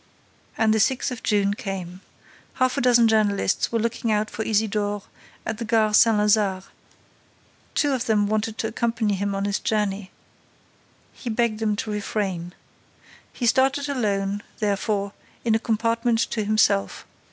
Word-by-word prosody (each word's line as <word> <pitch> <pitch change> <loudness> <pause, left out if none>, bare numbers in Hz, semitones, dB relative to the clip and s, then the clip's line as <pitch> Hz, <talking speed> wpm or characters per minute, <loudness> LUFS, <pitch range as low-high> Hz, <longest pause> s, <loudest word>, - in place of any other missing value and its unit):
And 220 -1 +3
the 220 - +2
sixth 255 +5 +1
of 240 -3 -6
June 200 -1 +1
came. 190 -3 -6 0.5
Half 255 -1 +1
a 280 - 0
dozen 240 -2 +5
journalists 210 -3 +1
were 230 - +1
looking 230 0 -1
out 215 0 0
for - - -5
Isidore 205 -2 0 0.4
at 220 0 -4
the - - -3
Gare 215 -1 +2
Saint 225 0 +5
Lazare. 210 -3 +2 1.1
Two 290 -2 +2
of 255 -1 -2
them 210 -2 +3
wanted 215 +1 -1
to 220 - -1
accompany 230 -1 -1
him 200 +1 -2
on 195 0 -1
his 200 0 -1
journey. 210 -4 -1 1.0
He 245 - -7
begged 225 -1 0
them 215 -2 0
to 215 +1 -4
refrain. 195 -4 -3 0.8
He 245 - -4
started 270 +4 +2
alone, 205 -6 -1 0.2
therefore, 200 -1 -1 0.3
in 225 - +3
a 220 - +3
compartment 230 +1 0
to 220 - -1
himself. 205 - +1
215 Hz, 150 wpm, -24 LUFS, 205-230 Hz, 1.1 s, dozen